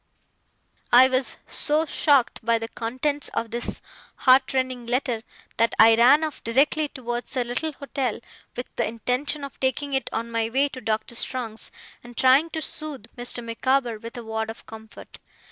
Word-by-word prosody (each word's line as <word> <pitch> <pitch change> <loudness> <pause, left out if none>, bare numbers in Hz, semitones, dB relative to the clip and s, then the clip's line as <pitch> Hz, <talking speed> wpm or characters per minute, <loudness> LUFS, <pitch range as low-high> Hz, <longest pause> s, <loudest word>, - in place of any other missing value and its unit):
I 255 +2 +8
was 255 -3 0
so 305 +2 0
shocked 280 -6 +2
by 230 +1 +3
the 225 0 -5
contents 260 +6 -1
of 230 0 -2
this 235 +1 -3 0.3
heart 260 +1 +4
rending 255 -2 -2
letter, 245 -2 0 0.4
that 230 0 +2
I 225 +1 +8
ran 255 +7 +6
off 310 -3 -4
directly 285 +6 +2
towards 240 0 -5
the 250 - +1
little 250 +6 -3
hotel 270 -4 -3 0.4
with 245 - -4
the 235 - +1
intention 250 +6 -1
of 280 - -8
taking 275 +2 -1
it 265 -2 0
on 230 +1 -3
my 225 -1 0
way 275 +4 +2
to 255 - -9
Doctor 220 +1 -2
Strong's, 235 -2 -3 0.3
and 240 0 -13
trying 265 +5 +5
to 320 -1 -4
soothe 285 -8 -6
Mr. 245 0 -3
Micawber 235 0 0
with 230 +2 -8
a 240 - -6
word 220 0 -3
of 225 - -9
comfort. 220 0 -12
250 Hz, 170 wpm, -24 LUFS, 230-275 Hz, 0.4 s, I